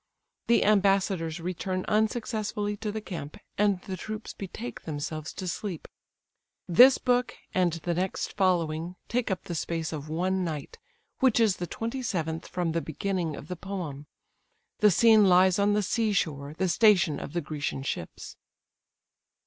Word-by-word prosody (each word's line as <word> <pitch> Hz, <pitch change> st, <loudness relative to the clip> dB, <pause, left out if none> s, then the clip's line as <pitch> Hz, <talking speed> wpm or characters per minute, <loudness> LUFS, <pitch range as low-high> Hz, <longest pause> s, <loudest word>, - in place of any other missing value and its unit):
The 235 Hz, -, +4 dB
ambassadors 195 Hz, -5 st, +2 dB
return 185 Hz, +2 st, -3 dB
unsuccessfully 215 Hz, -1 st, 0 dB
to 215 Hz, 0 st, -3 dB
the 215 Hz, +1 st, -4 dB
camp, 165 Hz, -8 st, -7 dB, 0.2 s
and 205 Hz, -2 st, +2 dB
the 190 Hz, -, -5 dB
troops 215 Hz, +4 st, -6 dB
betake 215 Hz, +5 st, -7 dB
themselves 155 Hz, 0 st, -5 dB
to 185 Hz, -, -6 dB
sleep. 180 Hz, -1 st, -4 dB, 0.8 s
This 250 Hz, +10 st, +8 dB
book, 250 Hz, -1 st, +1 dB, 0.2 s
and 180 Hz, -3 st, +2 dB
the 165 Hz, +1 st, -2 dB
next 185 Hz, +2 st, -2 dB
following, 175 Hz, -3 st, 0 dB
take 245 Hz, 0 st, -1 dB
up 190 Hz, -2 st, -2 dB
the 175 Hz, -, -5 dB
space 165 Hz, 0 st, -2 dB
of 150 Hz, -1 st, -6 dB
one 185 Hz, +4 st, 0 dB
night, 155 Hz, -5 st, -5 dB, 0.4 s
which 255 Hz, -3 st, +4 dB
is 215 Hz, -4 st, +3 dB
the 175 Hz, -, -4 dB
twenty 230 Hz, +7 st, -4 dB
seventh 165 Hz, -8 st, -3 dB
from 175 Hz, -3 st, -2 dB
the 165 Hz, +1 st, 0 dB
beginning 170 Hz, 0 st, -2 dB
of 145 Hz, -, -10 dB
the 180 Hz, -, -4 dB
poem. 170 Hz, -7 st, -6 dB, 0.7 s
The 210 Hz, -, +6 dB
scene 220 Hz, +2 st, +6 dB
lies 185 Hz, +1 st, +5 dB
on 205 Hz, +1 st, +3 dB
the 210 Hz, 0 st, +2 dB
sea 220 Hz, +2 st, +1 dB
shore, 145 Hz, -5 st, -2 dB
the 190 Hz, -, +1 dB
station 185 Hz, -6 st, +4 dB
of -, -, -7 dB
the 175 Hz, -, 0 dB
Grecian 145 Hz, -3 st, -4 dB
ships. 85 Hz, -11 st, -6 dB
185 Hz, 155 wpm, -28 LUFS, 165-210 Hz, 0.8 s, This